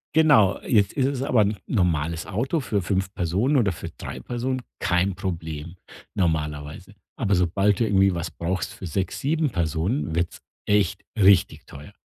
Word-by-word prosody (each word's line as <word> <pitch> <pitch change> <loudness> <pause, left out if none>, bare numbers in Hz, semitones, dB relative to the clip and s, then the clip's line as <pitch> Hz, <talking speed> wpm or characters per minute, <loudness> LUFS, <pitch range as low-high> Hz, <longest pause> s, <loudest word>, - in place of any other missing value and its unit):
Genau, 145 -12 +5
jetzt 105 -5 +2
ist 135 -2 +1
es 135 -2 -2
aber 125 -5 +3
'n 105 0 +1
normales 85 - 0
Auto 130 - -1
für 105 -6 -1
5 95 +2 -1
Personen 100 - +1
oder 105 -7 +2
für - - -7
3 - - -8
Personen 125 +1 -3 0.2
kein 90 +1 +1
Problem, 85 -3 -5 0.4
normalerweise. 75 +1 -2 0.2
Aber 100 -6 +1
sobald 95 +4 +2
du - - +5
irgendwie 95 -3 +3
was 85 -1 -4
brauchst 90 +3 -3
für 95 - -9
6, 95 +3 -2
7 155 +1 +1
Personen, 80 - -1
wird's 85 0 -2 0.3
echt 100 -1 +1 0.2
richtig 95 -5 +4
teuer. 70 +1 -11
95 Hz, 160 wpm, -24 LUFS, 85-110 Hz, 0.4 s, Genau